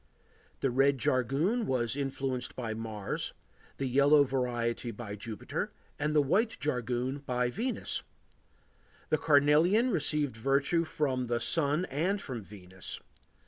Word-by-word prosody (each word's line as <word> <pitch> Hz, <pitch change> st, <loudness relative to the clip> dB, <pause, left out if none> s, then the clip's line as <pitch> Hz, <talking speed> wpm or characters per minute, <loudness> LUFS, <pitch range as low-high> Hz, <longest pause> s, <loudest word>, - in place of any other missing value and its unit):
The 135 Hz, -, +1 dB
red 135 Hz, +2 st, +3 dB
jargoon 135 Hz, -, +1 dB
was 120 Hz, -2 st, 0 dB
influenced 135 Hz, -2 st, -2 dB
by 115 Hz, -3 st, -3 dB
Mars, 110 Hz, -3 st, -4 dB, 0.4 s
the 135 Hz, -, -2 dB
yellow 140 Hz, +3 st, +5 dB
variety 120 Hz, -3 st, -1 dB
by 105 Hz, -2 st, -6 dB
Jupiter 110 Hz, 0 st, -4 dB, 0.3 s
and 150 Hz, +1 st, 0 dB
the 150 Hz, -, +5 dB
white 215 Hz, -, +1 dB
jargoon 125 Hz, -1 st, -1 dB
by 125 Hz, -3 st, -1 dB
Venus. 240 Hz, -, -2 dB, 1.1 s
The 155 Hz, -, +2 dB
carnelian 160 Hz, -, +4 dB
received 150 Hz, -, 0 dB
virtue 140 Hz, +7 st, +2 dB
from 130 Hz, -5 st, -1 dB
the 120 Hz, 0 st, 0 dB
Sun 150 Hz, +6 st, +2 dB
and 180 Hz, +9 st, 0 dB
from 130 Hz, -, -5 dB
Venus. 95 Hz, -2 st, -8 dB
135 Hz, 125 wpm, -31 LUFS, 120-150 Hz, 1.1 s, yellow